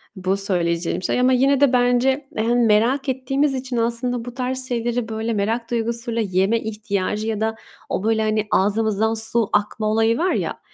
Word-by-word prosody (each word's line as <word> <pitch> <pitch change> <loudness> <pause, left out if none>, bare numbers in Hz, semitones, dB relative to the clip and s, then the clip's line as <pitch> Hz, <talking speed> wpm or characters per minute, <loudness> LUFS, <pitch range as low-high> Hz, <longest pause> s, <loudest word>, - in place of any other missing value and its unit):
bu 190 0 -1
söyleyeceğim 175 -3 -1
şey - - 0
ama 255 +1 +4
yine 270 +2 +3
de 280 -3 +4
bence, 250 +3 +2
hani, 230 +2 +1
merak 235 +6 +2
ettiğimiz 270 +2 0
için 255 -1 -4
aslında 235 +1 -1
bu 245 - -7
tarz 255 +1 -2
şeyleri 240 -1 -1
böyle 220 +1 -2
merak 225 +3 -1
duygusuyla 230 0 -1
yeme 195 +2 +1
ihtiyacı 210 -1 -3
ya 220 -1 -2
da 220 0 0 0.3
o - - -2
böyle, 220 0 +1
hani, 215 0 0
ağzımızdan 215 +2 +1
su 225 0 -1
akma 210 +1 0
olayı 225 +2 +2
var, 360 +5 +1
ya, - - -2
230 Hz, 175 wpm, -21 LUFS, 215-245 Hz, 0.3 s, ama